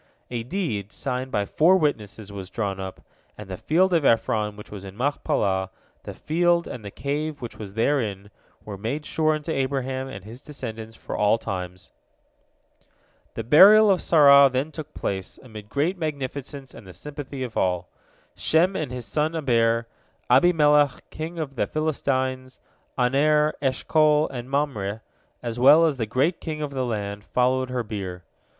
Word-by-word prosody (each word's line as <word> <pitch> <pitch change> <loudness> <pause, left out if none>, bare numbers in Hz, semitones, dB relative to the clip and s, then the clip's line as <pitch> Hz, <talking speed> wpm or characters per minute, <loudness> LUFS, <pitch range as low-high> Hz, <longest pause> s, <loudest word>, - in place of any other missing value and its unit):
A 120 -2 -2
deed, 115 - -3
signed 130 +1 -3
by 105 -6 -1
four 170 - +4
witnesses, 110 - -2
was 95 -2 -7
drawn 100 -4 -3
up, 95 -1 -7 0.4
and 105 - -9
the 95 - -5
field 180 - +2
of 165 -3 +3
Ephron, 110 -3 +1
which 105 - -12
was 100 -2 -8
in 95 0 -10
Machpelah, 100 -8 0 0.3
the - - -8
field, 170 +1 +1
and 120 - -7
the 100 - -6
cave 145 +6 -3
which 120 -3 -8
was 100 -2 -8
therein, 110 -6 -1 0.3
were 100 -2 -7
made 140 +9 -3
sure 155 0 +1
unto 155 +2 -5
Abraham 135 -1 -2
and 100 -8 -9
his 115 +4 -10
descendants 115 -6 -8
for - - -7
all 105 +2 +3
times. 90 -4 -6 1.4
The 115 - -3
burial 200 - +8
of 185 - +2
Sarah 140 -3 +7
then 135 +5 -1
took 155 -1 -8
place, 95 -1 -4
amid 105 -4 -11
great 165 +9 -1
magnificence 140 -3 -5
and 95 - -13
the 90 - -11
sympathy 140 - -7
of 120 -3 -6
all. 90 -1 0 0.5
Shem 175 +4 +2
and 150 -5 -3
his 125 -2 -6
son 155 +2 -1
Eber, 115 -6 +1 0.4
Abimelech 150 -1 +4
king 160 +2 -6
of 150 -4 -4
the 130 - -1
Philistines, 130 -4 -2 0.4
Aner, 150 +4 +3
Eshcol, 150 +3 +2
and 125 -1 -7
Mamre, 115 -7 -2 0.4
as 120 0 -4
well 145 +6 +7
as 150 -4 0
all - - -16
the 115 - 0
great 135 +10 0
of 155 -2 -3
the 130 -2 -2
land, 100 -2 -4
followed 130 +2 +1
her 125 -1 -2
bier. 95 -5 -6
130 Hz, 165 wpm, -24 LUFS, 110-150 Hz, 1.4 s, burial